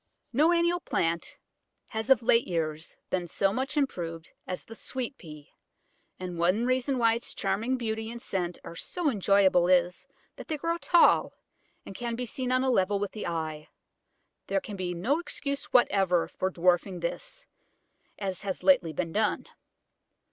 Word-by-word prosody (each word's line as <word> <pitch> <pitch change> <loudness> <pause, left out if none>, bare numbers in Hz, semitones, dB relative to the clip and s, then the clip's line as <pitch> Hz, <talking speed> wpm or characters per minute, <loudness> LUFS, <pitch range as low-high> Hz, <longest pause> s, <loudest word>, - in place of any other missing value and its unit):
No 305 +7 +4
annual 345 0 +2
plant 170 - -1 0.5
has 220 +3 -4
of 255 -3 +5
late 230 +1 +4
years 160 -2 -3
been 180 -2 -1
so 195 +3 +1
much 265 +5 -2
improved 170 - -2 0.2
as 180 - -5
the 225 - -10
Sweet 255 +3 -4
Pea, 150 -3 -12 0.7
and 180 -2 -5
one 185 +7 +2
reason 255 +1 +1
why 230 -2 +4
its 230 - -4
charming 250 +5 0
beauty 220 -2 -3
and 235 +1 -7
scent 180 -7 -3
are 170 - -9
so 325 - -1
enjoyable 195 -4 +4
is, 180 -1 +2 0.3
that - - -9
they 310 - -2
grow 335 +3 -1
tall, 340 +4 +4 0.5
and - - -8
can 235 +3 -3
be 250 +1 -3
seen 255 +2 -3
on 255 0 +3
a 260 - +2
level 200 -3 +2
with 200 0 -3
the 215 - -5
eye. 160 -2 -4 0.8
There 195 0 +1
can 205 - -8
be 180 -2 -3
no 255 - +1
excuse 280 -5 -3
whatever 195 -8 +3
for 185 - -2
dwarfing 180 0 +1
this, - - -5 0.7
as 190 -3 -4
has 195 -2 -4
lately 220 - +4
been 165 +1 -2
done. 215 0 +1
205 Hz, 165 wpm, -28 LUFS, 175-255 Hz, 0.8 s, of